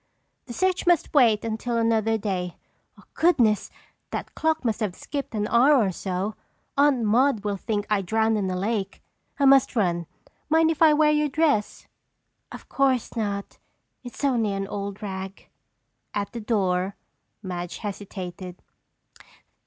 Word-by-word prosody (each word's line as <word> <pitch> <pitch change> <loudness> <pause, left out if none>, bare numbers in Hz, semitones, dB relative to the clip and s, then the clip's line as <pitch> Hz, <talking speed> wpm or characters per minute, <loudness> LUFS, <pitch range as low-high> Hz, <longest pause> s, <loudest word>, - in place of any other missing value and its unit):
"The 240 - -7
search 375 +4 0
must 350 -3 +2
wait 230 -7 +4
until 230 +2 -2
another 225 -1 +2
day. 185 -4 -3 0.6
Goodness! 240 - +2 0.4
That - - -5
clock 320 -3 0
must 225 -1 0
have 205 -5 -2
skipped 280 -5 -5
an 210 0 -1
hour 255 +7 +5
or 215 -8 +3
so! 190 +3 -3 0.4
Aunt 280 -4 +3
Maude 230 +1 +2
will 205 -1 -1
think 205 +1 -3
I 210 -2 +1
drowned 220 +3 +1
in 200 -3 -1
the 185 - -2
lake. 200 +1 -3 0.4
I 280 - +3
must 270 -1 +5
run. 175 -6 0 0.4
Mind 320 +1 +4
if 320 - -5
I 320 -1 +7
wear 300 0 +4
your 300 0 +1
dress?" 285 -7 0 0.7
"Of - - -10
course 265 -4 0
not. 200 -3 -3 0.4
It's 245 +3 -9
only 230 -7 +1
an 195 0 -2
old 200 +1 -5
rag." 190 -1 -6 0.7
At 200 -1 -2
the 235 - -6
door, 195 -3 0 0.5
Madge 175 -2 -5
hesitated. 185 -3 -7
220 Hz, 145 wpm, -25 LUFS, 195-265 Hz, 0.7 s, I